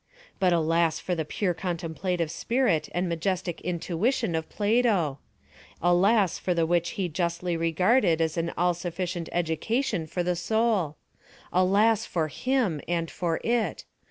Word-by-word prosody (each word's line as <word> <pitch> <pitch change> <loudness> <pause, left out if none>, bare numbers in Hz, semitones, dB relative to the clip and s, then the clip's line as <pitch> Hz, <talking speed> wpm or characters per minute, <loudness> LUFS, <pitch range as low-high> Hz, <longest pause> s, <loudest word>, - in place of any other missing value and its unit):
But 185 -2 +3
alas 165 -1 +2
for 180 - -2
the 165 -2 -1
pure 180 +4 -1
contemplative 170 -1 -2
spirit 230 -10 0
and 180 +1 -1
majestic 175 +1 -2
intuition 180 +5 -1
of 160 0 -2
Plato! 205 - +1 0.6
Alas 185 +3 +3
for 180 - -1
the 165 - +2
μουσικη - - -4
which 175 0 +1
he 190 -3 0
justly 170 +1 -2
regarded 170 +3 +2
as 160 -1 0
an 170 0 -1
all 175 +1 +3
sufficient 175 0 -4
education 175 - -1
for 175 +3 -2
the 180 0 0
soul! 200 -4 0 0.6
Alas 205 +4 +3
for 160 -3 -1
him 235 - 0
and 170 -1 -1
for 170 -2 -1
it! 235 -1 0
175 Hz, 145 wpm, -27 LUFS, 165-200 Hz, 0.6 s, But